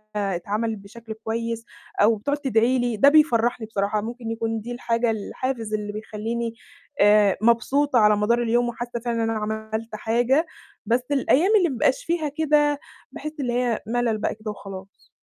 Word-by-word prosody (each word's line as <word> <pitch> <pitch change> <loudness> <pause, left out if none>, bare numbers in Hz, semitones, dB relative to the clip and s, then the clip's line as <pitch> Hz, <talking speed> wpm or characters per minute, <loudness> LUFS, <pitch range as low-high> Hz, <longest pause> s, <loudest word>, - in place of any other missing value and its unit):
اتعملِت 205 +3 -2
بشكل 220 +3 -10
كويس، 230 +1 -4 0.4
أو 220 +2 +5
بتقعد 285 +8 -2
تدعي 255 -2 +2
لي، 240 -3 -1
ده 280 +6 +7
بيفرّحني 240 -7 +3
بصراحة. 210 0 -1
ممكن 230 +1 -5
يكون 225 -1 -2
دي 240 - -7
الحاجة 235 -1 0
الحافز 225 +1 -4
اللي 210 -1 -2
بيخلّيني 225 +2 -4 0.5
آآ 205 -1 +5
مبسوطة 255 +4 +3
على 210 -1 +5
مدار 235 +3 +2
اليوم، 240 +1 +1
وحاسّة 240 0 -5
فعلًا 230 -1 -1
إن 225 - 0
أنا 225 -1 -1
عملت 220 +1 -4
حاجة، 240 +8 +1 0.4
بس 235 +2 +2
الأيام 285 +7 +3
اللي 360 -4 +3
ما 270 - -3
بيبقاش 255 +2 +1
فيها 330 -3 -1
كده، 295 -1 +2 0.3
باحس 305 - -6
اللي 245 -3 -1
هي 245 -2 0
ملل 235 -1 0
بقى 210 - -2
كده 215 0 -6
وخلاص. 195 -1 -11
230 Hz, 165 wpm, -24 LUFS, 215-245 Hz, 0.5 s, ده